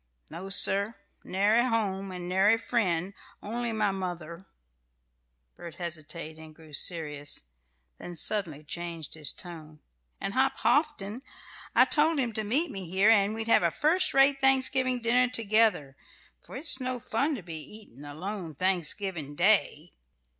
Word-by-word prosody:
"No, 190 Hz, +2 st, -6 dB
sir; 200 Hz, +2 st, +3 dB, 0.3 s
nary 205 Hz, +5 st, +2 dB
home, 200 Hz, -5 st, -1 dB
and 180 Hz, -1 st, -6 dB
nary 195 Hz, +5 st, +3 dB
friend; 195 Hz, -6 st, -1 dB, 0.3 s
only 235 Hz, +2 st, -3 dB
my 215 Hz, -2 st, 0 dB
mother" 175 Hz, -2 st, -6 dB, 1.1 s
Bert 170 Hz, -, -10 dB
hesitated, 160 Hz, -2 st, -6 dB
and 160 Hz, -1 st, -13 dB
grew 155 Hz, -1 st, -16 dB
serious; 150 Hz, -, -2 dB, 0.6 s
then 175 Hz, -, -8 dB
suddenly 170 Hz, -5 st, 0 dB
changed 170 Hz, 0 st, -6 dB
his 155 Hz, -4 st, +3 dB
tone 155 Hz, -3 st, -9 dB, 0.4 s
"and 195 Hz, -, -4 dB
Hop 265 Hz, +1 st, +1 dB
Houghton. 240 Hz, -4 st, 0 dB, 0.6 s
I -, -, +8 dB
told 315 Hz, +1 st, +3 dB
him 245 Hz, -4 st, 0 dB
to 220 Hz, -, -2 dB
meet 275 Hz, +11 st, +2 dB
me 190 Hz, -4 st, -6 dB
here, 195 Hz, +5 st, +4 dB
and 205 Hz, -1 st, +3 dB
we'd 225 Hz, 0 st, -4 dB
have 230 Hz, -, +5 dB
a 170 Hz, -, +2 dB
first 335 Hz, -, +1 dB
rate 275 Hz, 0 st, +4 dB
Thanksgiving 260 Hz, -2 st, +3 dB
dinner 250 Hz, +2 st, +3 dB
together; 215 Hz, -, +2 dB, 0.5 s
for -, -, -12 dB
it's 280 Hz, 0 st, +1 dB
no 255 Hz, -1 st, -3 dB
fun 275 Hz, +7 st, -1 dB
to 210 Hz, -, -8 dB
be 165 Hz, -2 st, -7 dB
eatin' 205 Hz, -, -12 dB
alone 165 Hz, +3 st, -6 dB
Thanksgiving 180 Hz, -3 st, -2 dB
Day! 175 Hz, -3 st, +1 dB
195 Hz, 145 wpm, -28 LUFS, 170-235 Hz, 1.1 s, I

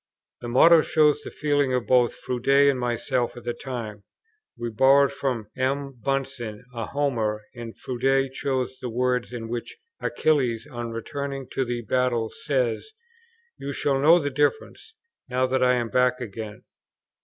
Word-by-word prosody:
The 120 Hz, -, -7 dB
motto 160 Hz, +7 st, +6 dB
shows 150 Hz, -1 st, +3 dB
the -, -, -7 dB
feeling 145 Hz, -3 st, +1 dB
of 125 Hz, -, -1 dB
both 125 Hz, -2 st, +3 dB
Froude 125 Hz, -1 st, -5 dB
and 140 Hz, -1 st, +5 dB
myself 120 Hz, 0 st, -1 dB
at 120 Hz, -, -9 dB
the 120 Hz, 0 st, -2 dB
time: 115 Hz, -7 st, -6 dB, 0.5 s
we 120 Hz, 0 st, -4 dB
borrowed 135 Hz, +5 st, +5 dB
from 115 Hz, -6 st, -3 dB
M. 135 Hz, +1 st, -1 dB
Bunsen 130 Hz, -5 st, -3 dB
a 115 Hz, -3 st, -4 dB
Homer, 115 Hz, -7 st, -1 dB
and 120 Hz, -2 st, -8 dB
Froude 135 Hz, +1 st, 0 dB
chose 130 Hz, -2 st, -2 dB
the 125 Hz, -, -4 dB
words 125 Hz, +1 st, 0 dB
in 115 Hz, -2 st, -6 dB
which 120 Hz, +1 st, -5 dB, 0.2 s
Achilles, 130 Hz, -7 st, +1 dB
on 120 Hz, -5 st, -6 dB
returning 135 Hz, +4 st, -5 dB
to 135 Hz, -, -1 dB
the 120 Hz, -1 st, -3 dB
battle, 120 Hz, -1 st, 0 dB
says, 130 Hz, -, -2 dB, 0.7 s
"You 140 Hz, -, -4 dB
shall 135 Hz, 0 st, 0 dB
know 160 Hz, +5 st, +7 dB
the 145 Hz, -4 st, -1 dB
difference, 145 Hz, -, -1 dB, 0.3 s
now 130 Hz, +1 st, +1 dB
that 130 Hz, 0 st, +1 dB
I 125 Hz, 0 st, +4 dB
am 120 Hz, -2 st, -1 dB
back 125 Hz, 0 st, +2 dB
again." 110 Hz, -2 st, -7 dB
125 Hz, 155 wpm, -25 LUFS, 120-140 Hz, 0.7 s, know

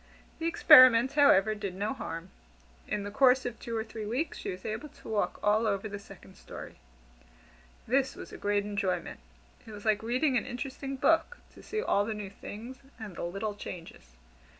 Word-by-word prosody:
The 330 Hz, -, -1 dB
experiment, 255 Hz, -6 st, +7 dB
however, 220 Hz, -8 st, +5 dB
did 200 Hz, -3 st, -5 dB
no 205 Hz, +6 st, -2 dB
harm. 165 Hz, -7 st, -7 dB, 0.6 s
In 205 Hz, -, -2 dB
the 205 Hz, -, -6 dB
course 260 Hz, +2 st, +4 dB
of 240 Hz, -2 st, -5 dB
two 230 Hz, -1 st, -4 dB
or 220 Hz, -, -1 dB
three 220 Hz, -1 st, -7 dB
weeks, 260 Hz, +9 st, -2 dB
she -, -, -5 dB
was 185 Hz, 0 st, -7 dB
able 220 Hz, +8 st, -4 dB
to -, -, -16 dB
walk 215 Hz, -2 st, -1 dB
all 215 Hz, +2 st, +3 dB
over 200 Hz, 0 st, -1 dB
the 205 Hz, -1 st, -6 dB
second 195 Hz, -1 st, -15 dB
story. -, -, -10 dB, 1.1 s
This 265 Hz, +2 st, +1 dB
was -, -, -10 dB
a -, -, -7 dB
great 205 Hz, 0 st, 0 dB
enjoyment. 195 Hz, -4 st, -2 dB, 0.5 s
It -, -, -9 dB
was 205 Hz, 0 st, -10 dB
like 215 Hz, -1 st, +2 dB
reading 255 Hz, +4 st, +1 dB
an 215 Hz, -, -1 dB
interesting 270 Hz, +2 st, -5 dB
book 325 Hz, -, +2 dB, 0.2 s
to -, -, -14 dB
see 430 Hz, +1 st, -3 dB
all 200 Hz, -, +2 dB
the 215 Hz, +1 st, -3 dB
new 205 Hz, -2 st, -6 dB
things, 230 Hz, +5 st, -9 dB, 0.2 s
and 210 Hz, -5 st, -8 dB
the -, -, -6 dB
little 195 Hz, +5 st, -3 dB
changes. 165 Hz, -, -10 dB
215 Hz, 190 wpm, -30 LUFS, 200-255 Hz, 1.1 s, experiment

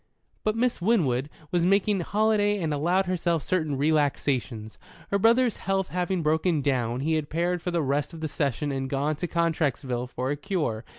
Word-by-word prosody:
But 215 Hz, 0 st, +1 dB
Miss 240 Hz, -3 st, 0 dB
Winwood 150 Hz, -, +1 dB, 0.2 s
was 175 Hz, -1 st, +2 dB
making 195 Hz, +2 st, +3 dB
holiday 205 Hz, +2 st, +1 dB
and 160 Hz, -4 st, -1 dB
allowed 175 Hz, +6 st, +1 dB
herself 170 Hz, -3 st, 0 dB
certain 155 Hz, -6 st, -1 dB
relaxations. 135 Hz, -7 st, 0 dB, 0.3 s
Her 200 Hz, -, +2 dB
brother's 235 Hz, +2 st, +3 dB
health 195 Hz, -1 st, -1 dB
having 180 Hz, 0 st, -1 dB
broken 160 Hz, 0 st, +1 dB
down, 125 Hz, -3 st, 0 dB
he 160 Hz, +3 st, 0 dB
had 155 Hz, -2 st, -1 dB
paired 175 Hz, +2 st, 0 dB
for 180 Hz, -, -3 dB
the 170 Hz, -2 st, 0 dB
rest 140 Hz, +1 st, -1 dB
of 165 Hz, -, -9 dB
the 160 Hz, -, -2 dB
session 145 Hz, -1 st, -1 dB
and 135 Hz, -1 st, -3 dB
gone 145 Hz, +3 st, 0 dB
to 175 Hz, -, -3 dB
Contrexeville 150 Hz, -7 st, -1 dB
for 130 Hz, +1 st, -3 dB
a -, -, 0 dB
cure. 145 Hz, -, -2 dB
160 Hz, 180 wpm, -26 LUFS, 140-185 Hz, 0.3 s, making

